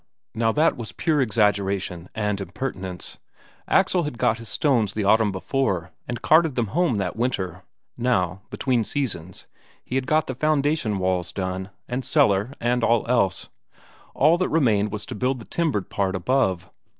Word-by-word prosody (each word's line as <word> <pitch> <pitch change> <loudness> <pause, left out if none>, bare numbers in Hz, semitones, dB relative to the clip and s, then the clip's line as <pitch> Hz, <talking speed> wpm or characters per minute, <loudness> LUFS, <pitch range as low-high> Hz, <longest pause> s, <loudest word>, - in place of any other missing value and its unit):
Now 115 0 +1
that 155 +2 +3
was 110 -6 -7
pure 155 - +1
exaggeration 100 -6 0
and 105 -2 -1
impertinence. 95 -5 -5 0.5
Axel 180 - +3
had 150 -7 -4
got 115 +1 +1
his 115 -2 -7
stones 110 - +1
the 105 - -2
autumn 110 +1 +4
before, 95 -3 -1 0.2
and 120 -1 -5
carted 160 -3 +4
them 115 -4 0
home 170 -6 +2
that 95 -3 -2
winter; 95 -7 -2 0.4
now, 95 -7 0
between 125 -4 0
seasons, 100 - -4 0.4
he - - -8
had 130 0 0
got 155 +1 +3
the 130 - -4
foundation 145 -5 +1
walls 90 -2 -1
done, 95 0 -4 0.2
and 125 +2 -3
cellar 100 +2 +2
and 120 0 +1
all 115 -1 +3
else 115 -7 +1 0.7
all 160 +5 +4
that 185 - +1
remained 110 -10 +2
was 105 -1 -4
to - - -7
build 130 +5 0
the 115 - -10
timbered 150 - -1
part 100 -1 0
above. 95 -3 +1
110 Hz, 160 wpm, -24 LUFS, 95-130 Hz, 0.7 s, autumn